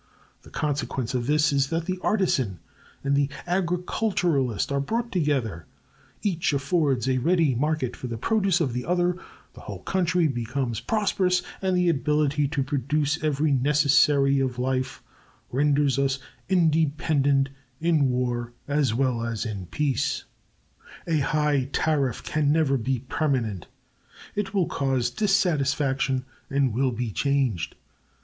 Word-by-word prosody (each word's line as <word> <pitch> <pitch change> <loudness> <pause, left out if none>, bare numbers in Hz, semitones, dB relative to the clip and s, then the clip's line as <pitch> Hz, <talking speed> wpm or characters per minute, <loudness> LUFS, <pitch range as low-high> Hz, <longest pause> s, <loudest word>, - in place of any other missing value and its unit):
The - - -16
consequence 135 -4 -2
of 125 -1 -1
this 150 0 +3
is 140 -1 +2
that 165 +2 -2
the 185 0 -3
artisan 135 - +1 0.5
and 140 0 +1
the 140 0 +2 0.2
agriculturist 175 - 0
are 140 - +1
brought 230 +11 -2
together, 130 - -1 0.6
each 175 -7 0
affords 140 -3 +1
a 130 -1 +2
ready 165 0 +2
market 135 -1 -1
for 125 - -6
the 115 -1 -4
produce 195 - +1
of 140 -8 0
the 125 +1 -2
other, 175 +2 +1 0.4
the - - -13
whole - - -8
country 180 -2 +1
becomes 120 -2 -2
prosperous, 185 - +1 0.2
and 190 -1 +1
the 180 0 +2
ability 150 -1 +1
to 140 -1 -1
produce 145 +2 -1
every 150 0 +1
necessary 140 0 +4
of 130 -2 -1
life 130 +1 -2 0.5
renders 140 0 +2
us 135 -1 +1 0.3
independent 155 -5 +2 0.3
in 155 -5 +2
war 120 -1 -1
as 140 -6 +1
well 125 -2 0
as 115 0 -3
in 100 -5 -5
peace. 140 - -1 0.8
A 160 -3 +1
high 145 -2 +1
tariff 140 -8 0
can 150 -2 +1
never 150 -3 +2
be 130 +1 0
permanent. 120 - -1 0.7
It 205 -1 -2
will 195 -4 +2
cause 130 -3 0
dissatisfaction, 140 -9 +1 0.2
and 135 -4 +1
will 130 +2 +1
be 120 -1 -3
changed. 130 - 0
140 Hz, 135 wpm, -25 LUFS, 130-160 Hz, 0.8 s, necessary